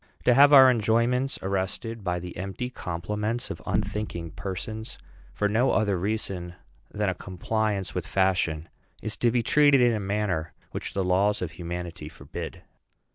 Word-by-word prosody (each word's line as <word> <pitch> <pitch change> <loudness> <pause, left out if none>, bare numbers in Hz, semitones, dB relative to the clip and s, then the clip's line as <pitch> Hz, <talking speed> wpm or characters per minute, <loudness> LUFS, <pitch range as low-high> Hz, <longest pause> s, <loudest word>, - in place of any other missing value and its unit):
To 125 - +5
have 140 +3 +7
our 135 -2 +9
enjoyments 120 +3 +1
arrested 100 +4 -2
by 90 -2 -1
the 90 0 -7
empty 95 +7 -4
compliments 105 +5 -3
of - - -7
unthinking 85 -6 -2
persons 105 +4 -6 0.3
for 105 - 0
no 115 +5 +2
other 105 -3 +2
reason 95 -2 -3 0.4
than 105 0 -1
a 95 - +1
compliance 100 +1 -2
with 90 -4 -3
fashion, 90 -4 +1 0.4
is 110 - -1
to 120 - +3
be 120 0 +1
treated 145 +2 +5
in 120 -1 +4
a 110 - -1
manner 100 -5 -1 0.2
which - - -4
the 95 - +1
laws 95 +2 +2
of 85 - -4
humanity 85 -2 -6
forbid. - - -8
100 Hz, 155 wpm, -26 LUFS, 90-115 Hz, 0.4 s, our